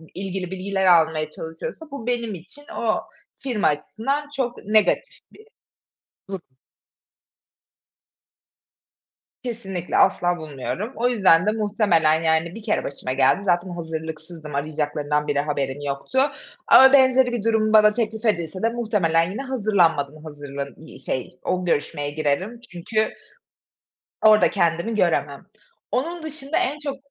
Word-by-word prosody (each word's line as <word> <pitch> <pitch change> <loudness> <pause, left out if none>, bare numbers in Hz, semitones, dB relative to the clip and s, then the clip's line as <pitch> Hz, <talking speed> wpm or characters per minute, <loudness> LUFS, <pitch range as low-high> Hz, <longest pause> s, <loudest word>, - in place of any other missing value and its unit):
ilgili 190 -1 -4
bilgiler 190 +1 -2
almaya 160 -3 +4
çalışıyorsa 165 - -8
bu 260 -4 -7
benim 235 -4 -1
için 185 - -10
o 220 -2 +1 0.4
firma 245 -6 0
açısından 270 - -2
çok 245 -3 -2
negatif 215 - +2 1.1
bir 195 - -5
durum. 150 -8 -10 2.9
Kesinlikle, 195 -8 -3
asla 175 -2 +3
bulmuyorum. 155 - -5
O 245 +2 +1
yüzden 190 -7 +4
de 210 - +3
muhtemelen, 200 -8 +2
yani, 160 +1 +1
bir 225 - -9
kere 215 - 0
başıma 130 -2 -4
geldi. 135 +8 +3
Zaten 180 -1 +1
hazırlıksızdım. 160 -2 -7
Arayacaklarından 150 0 -1
bile 145 - +1
haberim 145 -1 -2
yoktu 140 - -2 0.5
ama 265 +1 +8
benzeri 260 -2 +5
bir 240 -4 -3
durum 220 -1 +2
bana 210 -1 +7
teklif 220 0 -3
edilse 180 -4 0
de 230 - +2
muhtemelen 195 -8 +1
yine 220 +7 -4
hazırlanmadan 175 - +1
hazırlan 140 -2 -7
iii, 160 - -13
şey, 130 0 -4
o 185 0 -1
görüşmeye 145 -3 -1
girerim 155 +10 -1
çünkü 215 +5 -1 1.2
orada 215 -1 +6
kendimi 170 +4 0
göremem. 155 -8 0 0.5
Onun 330 +7 -2
dışında 310 -1 -4
en 365 -5 -1
çok 285 -2 -4
185 Hz, 125 wpm, -23 LUFS, 155-225 Hz, 2.9 s, ama